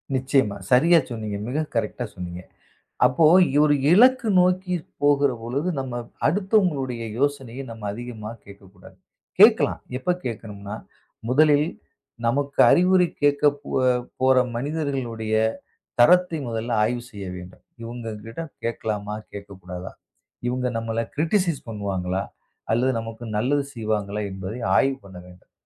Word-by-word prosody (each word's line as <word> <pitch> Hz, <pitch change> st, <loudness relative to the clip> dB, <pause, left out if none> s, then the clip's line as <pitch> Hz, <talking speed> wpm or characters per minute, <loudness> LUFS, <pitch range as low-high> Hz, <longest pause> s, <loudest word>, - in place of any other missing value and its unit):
நிச்சயமா. 130 Hz, -6 st, +1 dB
சரியா 165 Hz, +7 st, +6 dB
சொன்னீங்க. 110 Hz, -4 st, -4 dB
மிகக் 150 Hz, +5 st, -3 dB
கரெக்டா 120 Hz, +2 st, -1 dB
சொன்னீங்க. 90 Hz, -1 st, -7 dB, 0.6 s
அப்போ 135 Hz, +6 st, +3 dB, 0.4 s
ஒரு 145 Hz, -1 st, +4 dB, 0.2 s
இலக்கு 250 Hz, +5 st, +5 dB
நோக்கிப் 180 Hz, -2 st, 0 dB, 0.2 s
போகிறபொழுது 140 Hz, +1 st, +1 dB
நம்ம 130 Hz, -2 st, -5 dB, 0.3 s
அடுத்தவங்களுடைய 165 Hz, -, +1 dB, 0.2 s
யோசனையை 135 Hz, -2 st, -2 dB
நம்ம 110 Hz, -2 st, -7 dB
அதிகமா 115 Hz, -2 st, -7 dB, 0.2 s
கேட்கக் 100 Hz, -1 st, -15 dB
கூடாது. 90 Hz, -, -17 dB, 0.4 s
கேட்கலாம். -, -, +6 dB, 0.2 s
எப்ப 135 Hz, -, -5 dB, 0.2 s
கேட்கணும்னா 105 Hz, -3 st, -6 dB, 0.5 s
முதலில் 150 Hz, +2 st, +4 dB, 0.6 s
நமக்கு 140 Hz, +4 st, -1 dB
அறிவுரை 180 Hz, 0 st, +4 dB, 0.2 s
கேட்கப் 145 Hz, 0 st, +3 dB
போ -, -, -10 dB, 0.5 s
போற 130 Hz, 0 st, +4 dB, 0.2 s
மனிதர்களுடைய 130 Hz, -5 st, -3 dB, 0.7 s
தரத்தை 180 Hz, +6 st, +5 dB
முதல்ல 115 Hz, +1 st, -3 dB
ஆய்வு 120 Hz, +2 st, -1 dB
செய்ய 100 Hz, -4 st, -8 dB
வேண்டும். 90 Hz, +1 st, -12 dB, 0.2 s
இவங்ககிட்ட 115 Hz, +1 st, -7 dB, 0.2 s
கேட்கலாமா, 105 Hz, -2 st, -3 dB, 0.2 s
கேட்கக்கூடாதா, 95 Hz, -2 st, -8 dB, 0.6 s
இவங்க 125 Hz, +1 st, -1 dB
நம்மள 115 Hz, 0 st, -2 dB
க்ரிடிசைஸ் 165 Hz, 0 st, +1 dB
பண்ணுவாங்களா? 95 Hz, -3 st, -2 dB, 0.5 s
அல்லது 125 Hz, +4 st, +2 dB
நமக்கு 115 Hz, +1 st, -8 dB
நல்லது 140 Hz, +6 st, +1 dB
செய்வாங்களா? 105 Hz, -2 st, -2 dB
என்பதை 95 Hz, +5 st, -6 dB, 0.2 s
ஆய்வு 135 Hz, 0 st, +3 dB
பண்ண 95 Hz, -2 st, -11 dB
வேண்டும். 90 Hz, 0 st, -18 dB
120 Hz, 110 wpm, -24 LUFS, 105-145 Hz, 0.7 s, சரியா